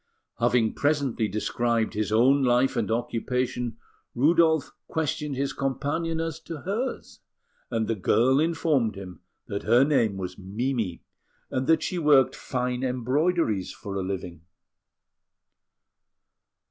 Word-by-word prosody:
Having 120 -2 +2
presently 140 -7 0
described 115 +3 -1
his 105 -1 -2
own 130 +6 +4
life 125 +1 +3
and 115 -4 -1
occupation, 120 +1 -2 0.4
Rudolf 160 +3 +3 0.2
questioned 150 -2 -2
his 140 +1 -1
companion 145 +5 -2
as 165 -1 -3
to 160 -2 -8
hers; 225 +8 -4 0.5
and 115 -2 -1
the 115 - +1
girl 115 +6 +3
informed 150 -8 +1
him 90 -4 -9 0.2
that 100 - -4
her 120 +3 +4
name 115 -9 +2
was 90 0 -6
Mimi, 105 -1 -3 0.5
and 130 0 -1
that 160 -1 +4
she 180 +2 -2
worked 145 -5 +4
fine 125 -1 -2
embroideries 130 - 0
for 100 - -8
a 95 - -1
living. 90 -3 -5
125 Hz, 120 wpm, -26 LUFS, 110-150 Hz, 0.5 s, own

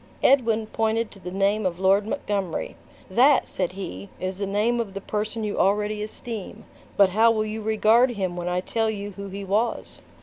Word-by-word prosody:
Edwin 230 -5 +3
pointed 225 +1 -1
to 195 - -13
the 180 -1 -7
name 200 +3 +1
of 180 -2 -2
Lord 195 +2 +3
Montgomery. 200 -6 -3 0.3
"That," 255 +8 +4
said 185 -1 -2
he, 100 - -7
"is 185 +1 -4
the 200 - -2
name 215 +5 +1
of 205 -4 -4
the - - -2
person 215 +2 -3
you 210 -1 -2
already 210 +2 +1
esteem; 215 -1 -6 0.3
but 200 -2 +6
how 220 +5 +4
will 215 -1 +1
you 215 +1 -4
regard 220 +3 +4
him 190 -6 -3
when 175 0 -3
I 180 0 0
tell 225 +3 -1
you 205 -1 -4
who 200 +1 -8
he 195 +1 -6
was?" 210 +5 -1
210 Hz, 195 wpm, -24 LUFS, 195-220 Hz, 0.3 s, but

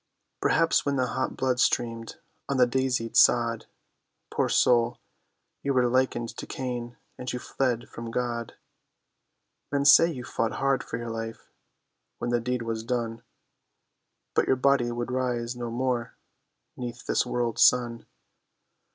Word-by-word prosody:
Perhaps - - +3
when 140 -1 0
the 130 -1 +1
hot 130 - -2
blood 130 -1 0
streamed 115 -2 0 0.3
on 140 - 0
the 125 - +6
daisied 125 -2 -1
sod, 115 -1 +4 0.6
Poor - - 0
soul, 120 -1 +3 0.6
you 140 -1 -1
were 125 -1 +4
likened 120 -2 +1
to - - -6
Cain, 120 -2 -5 0.2
and 125 0 -4
you - - -3
fled 125 -1 -2
from 115 0 -8
God; 120 -1 -3 1.2
Men 140 0 0
say 165 +3 +8
you 130 -6 -6
fought 115 -2 -2
hard 135 -1 +1
for 115 - -5
your 120 -1 -5
life, 115 0 -6 0.7
when 120 - -3
the 120 - +2
deed 125 0 -2
was 115 -1 -3
done; 115 -1 -2 1.1
But - - +2
your - - +4
body 130 -2 +2
would 120 +1 -3
rise 125 -1 -1
no 120 -1 -4
more 120 0 -2 0.6
'neath 120 -1 -7
this - - +2
world's 120 -2 -1
sun. 120 -2 +3
120 Hz, 145 wpm, -27 LUFS, 115-130 Hz, 1.2 s, say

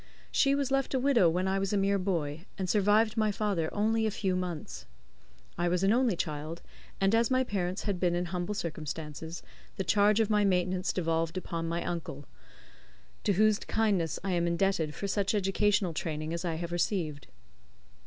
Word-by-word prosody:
She 275 0 +3
was 280 -2 -1
left 270 0 +1
a - - +2
widow 250 -9 +4
when 180 +3 0
I 195 +1 +1
was 195 +1 -1
a - - +3
mere 200 0 +2
boy, 165 -3 -2
and 190 -2 -2
survived 210 +3 +3
my 215 -1 +2
father 200 -6 -1
only 220 +2 +1
a - - +2
few 195 -3 -1
months. 180 - -5 0.7
I 175 - +2
was 180 +1 +1
an 195 +2 +4
only 240 -4 +2
child, 155 +1 -4 0.4
and 195 +2 +2
as 230 0 +3
my 260 0 +3
parents 190 -5 -2
had 200 -4 -2
been 175 -1 +1
in 175 +1 -1
humble 180 +3 -3
circumstances, 160 -1 -5 0.3
the 190 - -1
charge 210 +2 +3
of 220 - +3
my 210 -1 +3
maintenance 185 -1 +1
devolved 165 -1 -1
upon 165 -2 -3
my 170 +1 -2
uncle, 155 -5 -5 1.0
to 205 - +3
whose 215 +2 +3
kindness 200 -8 0
I 195 - -1
am 170 -1 +1
indebted 170 -3 0
for 200 - -3
such 200 +1 0
educational 195 -2 +1
training 155 0 -3
as 170 +1 -3
I 170 -2 -1
have 170 +1 -5
received. 170 -5 -1
185 Hz, 185 wpm, -30 LUFS, 170-210 Hz, 1.0 s, widow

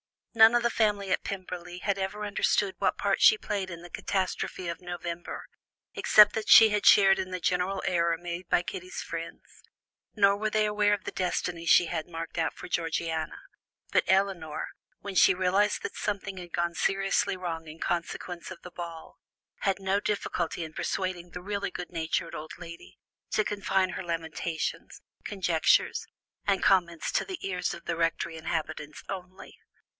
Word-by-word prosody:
None 225 0 +7
of 240 - +3
the 235 - +2
family 205 -4 +1
at - - 0
Pemberley 180 -2 -6
had 195 +1 -1
ever 205 +2 -3
understood 200 -1 +1
what - - +1
part - - 0
she 435 - +8
played 200 - -3
in 170 -2 -8
the 175 - -10
catastrophe 185 -1 -2
of 170 - -4
November, 175 -1 -6 0.5
except 210 -1 +6
that 220 -1 -3
she 225 -1 +10
had 210 -1 0
shared 195 -1 +7
in 185 -1 -3
the 185 -1 -4
general 180 +3 0
error 170 -2 +2
made 175 +1 -6
by 180 0 +2
Kitty's 365 - -6
friends, - - -8 0.5
nor 200 -1 +4
were 215 +1 -1
they 215 0 +2
aware 210 0 +2
of 205 - -2
the - - -5
destiny 175 -2 -2
she 170 +1 +6
had 160 - -3
marked 165 -1 -7
out 160 - 0
for - - -10
Georgiana; 165 -1 -2 0.5
but - - +3
Elinor, 190 -5 0 0.3
when 200 - -6
she 190 - +6
realized 190 +3 +1
that - - -5
something 195 -1 -3
had 175 -2 -9
gone 170 0 0
seriously 195 +1 +1
wrong 165 -3 -5
in 155 +1 -9
consequence 175 0 -3
of 185 -2 -9
the 180 - -10
ball, 170 -2 -8 0.4
had 195 -1 0
no 195 +1 +1
difficulty 175 -5 -2
in 160 -1 -8
persuading 180 -1 -3
the 180 - -7
really 200 0 -2
good 180 -1 -7
natured 165 +1 -2
old 155 -1 -7
lady 170 -1 -11 0.3
to 215 - +2
confine 195 -2 0
her 190 - -5
lamentations, 165 -1 -4 0.2
conjectures, 180 -5 +2 0.4
and 195 -2 +2
comments 170 -4 +2
to - - 0
the 375 - -6
ears 180 -2 -1
of - - -9
the 165 - -2
Rectory 165 0 -1
inhabitants 155 -2 -4
only. 185 -1 -8
185 Hz, 170 wpm, -28 LUFS, 170-200 Hz, 0.5 s, she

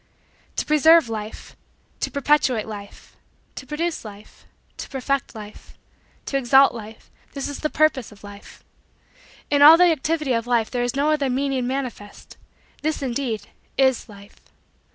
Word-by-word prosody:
To - - -2
preserve 315 -1 +5
Life 215 -1 -7 0.4
to - - -2
perpetuate 280 -5 +1
Life 205 -2 -11 0.4
to 260 - -10
produce 325 +3 -3
Life 210 -1 -13 0.3
to - - -7
perfect 270 -1 -2
Life 210 -1 -12 0.5
to 275 - -1
exalt 270 +1 +5
Life 220 -1 -11 0.2
this 275 -1 -4
is 285 - -6
the 305 - -2
purpose 300 -8 +1
of 205 -1 -17
Life. 205 0 -13 0.9
In 285 -1 +3
all 310 +3 +10
the 355 0 +5
activity 305 -2 -1
of 230 0 -2
Life 235 -3 +1
there 245 - -1
is 245 0 -2
no 290 +2 +1
other 290 -3 0
meaning 265 -1 -1
manifest. 250 -6 -6 0.4
This, 310 -1 -2
indeed, 245 -3 -3 0.3
is 265 -3 +2
Life. 200 -1 -15
265 Hz, 150 wpm, -22 LUFS, 225-290 Hz, 0.9 s, all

